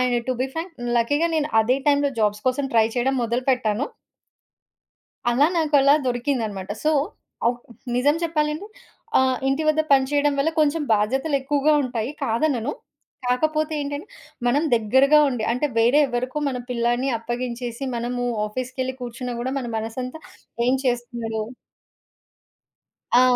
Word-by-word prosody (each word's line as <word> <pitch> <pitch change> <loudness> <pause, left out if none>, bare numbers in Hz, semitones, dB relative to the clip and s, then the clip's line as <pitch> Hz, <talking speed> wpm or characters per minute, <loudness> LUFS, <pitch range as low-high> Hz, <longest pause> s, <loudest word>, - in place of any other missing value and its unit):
And 250 -1 +2
to - - +3
be 260 - +1
Frank 330 +2 -4
హ్మ్. 240 0 -3
లక్కీ‌గా 290 +8 +2
నేను 305 -1 +1
అదే 255 +4 +1
టైంలో 285 0 +3
జాబ్స్ 210 0 0
కోసం 270 +2 -1
ట్రై 225 -1 +5
చేయడం 265 +3 +1
మొదలు 235 +2 -1
పెట్టాను. 250 0 0 1.4
అలా 265 +5 +4
నాకలా 290 -3 +4
దొరికిందనమాట. 240 -6 -2
సో, 310 - +3 0.5
ఆ! - - +6 0.5
నిజం 290 +5 +3
చెప్పాలంటే 310 +2 -1 0.5
ఆహ్, 260 -1 +2
ఇంటి 275 +4 +1
వద్ద 310 0 +4
పని 270 -1 +6
చేయడం 290 0 +2
వల్ల 285 +3 +2
కొంచెం 305 +1 +2
బాధ్యతలు 265 +8 +1
ఎక్కువగా 290 +2 +2
ఉంటాయి 240 -1 -3
కాదనను. 245 +2 0 0.5
కాకపోతే 310 +5 +1
ఏంటంటే 285 +5 -5 0.4
మనం 280 +6 +2
దగ్గరగా 265 +7 +4
ఉండి 245 -4 -3
అంటే 250 +5 0
వేరే 240 +6 +5
ఎవ్వరికో 255 +3 -3
మన 260 -2 -2
పిల్లాడిని 240 +2 0
అప్పగించేసి, 240 +1 -4
మనము 245 +1 -2 0.2
ఆఫీస్‌‌కెళ్లి 255 +3 -4
కూర్చున్నా 245 +1 -5
గూడా 260 +2 -2
మన 245 - -5
మనసంతా 250 +7 -5 0.5
ఏం 255 - +4
చేస్తున్నాడో 240 -3 -2 1.8
ఆ! - - +7
255 Hz, 135 wpm, -23 LUFS, 240-290 Hz, 1.8 s, ఆ